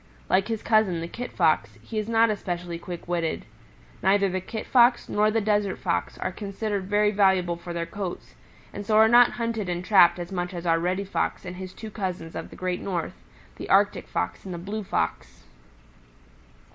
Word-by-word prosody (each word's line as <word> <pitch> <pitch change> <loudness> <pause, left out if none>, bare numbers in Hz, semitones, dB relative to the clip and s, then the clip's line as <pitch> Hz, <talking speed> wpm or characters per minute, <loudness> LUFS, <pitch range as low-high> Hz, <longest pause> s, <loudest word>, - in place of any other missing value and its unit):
Like 195 +2 +3
his 225 -2 -3
cousin, 215 -6 +3
the 165 - -4
Kit 245 +7 -6
Fox, 115 - +1
he 220 - -4
is 215 +1 -4
not 225 0 +4
especially 175 -4 -4
quick 175 0 -8
witted. 170 -2 -2 0.6
Neither 195 +1 +3
the 185 0 -2
Kit 220 +4 -6
Fox 245 -1 +4
nor 210 +1 +2
the 225 +1 +1
Desert 205 -2 +1
Fox - - -2
are - - -3
considered 200 -1 -4
very 205 +1 +2
valuable 190 -4 +3
for 170 +1 -9
their 170 0 -2
coats, 190 -1 -6 0.4
and 205 - -5
so 215 +1 +2
are 220 0 +7
not 240 +1 +6
hunted 230 -5 -2
and 175 0 -3
trapped 185 -5 +6
as 175 0 -6
much 180 0 -3
as 170 0 -6
are 165 -1 +3
Reddy 185 +3 -1
Fox 195 - -2
and 180 0 -7
his 185 0 -7
two 220 +3 -9
cousins 180 -5 -4
of - - -6
the - - -12
Great 180 -1 -3
North, 175 -4 -3 0.4
the - - -7
Arctic - - +3
Fox 90 0 -3
and 185 -2 -6
the - - -5
Blue 205 +5 -5
Fox. - - -3
190 Hz, 195 wpm, -25 LUFS, 175-215 Hz, 0.6 s, are